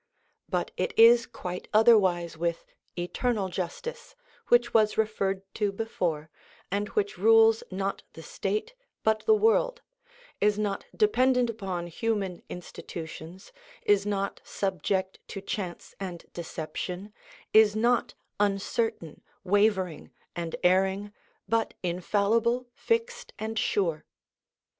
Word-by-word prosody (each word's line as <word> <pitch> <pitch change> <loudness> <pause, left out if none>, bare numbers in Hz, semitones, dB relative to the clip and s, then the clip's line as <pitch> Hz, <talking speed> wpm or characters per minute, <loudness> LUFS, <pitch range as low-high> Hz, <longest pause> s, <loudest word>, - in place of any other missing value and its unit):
But - - -1
it 480 - -2
is 230 +1 +7
quite 180 -6 -6
otherwise 190 -7 +5
with 170 +1 -2 0.3
eternal 195 +3 -1
justice, 475 - -5 0.3
which 240 0 +4
was 215 -1 +3
referred 195 -3 0
to 210 -2 0
before, 170 -7 -3 0.4
and 205 +2 0
which 200 -3 0
rules 225 +2 +6
not 195 +1 -3
the - - -10
state 430 +3 -3 0.3
but 220 0 +2
the 440 - +7
world, 480 +3 +2 0.6
is 210 0 +3
not 210 -2 -2
dependent 255 - +3
upon 190 -6 -4
human 195 0 -2
institutions, 170 0 -8 0.3
is 205 -1 +4
not 200 -1 -2
subject 190 0 -2
to - - -6
chance 190 -2 -5
and 180 -3 -6
deception, 175 +4 -5 0.4
is 215 -1 +6
not 235 +2 +1 0.2
uncertain, 200 -3 -1 0.2
wavering, 195 -4 +1 0.3
and 170 -1 -3
erring, 190 +3 +2 0.3
but 225 0 0
infallible, 210 +7 +1
fixed, 460 - -2
and 220 0 -3
sure. 165 -6 0
205 Hz, 110 wpm, -28 LUFS, 180-225 Hz, 0.6 s, is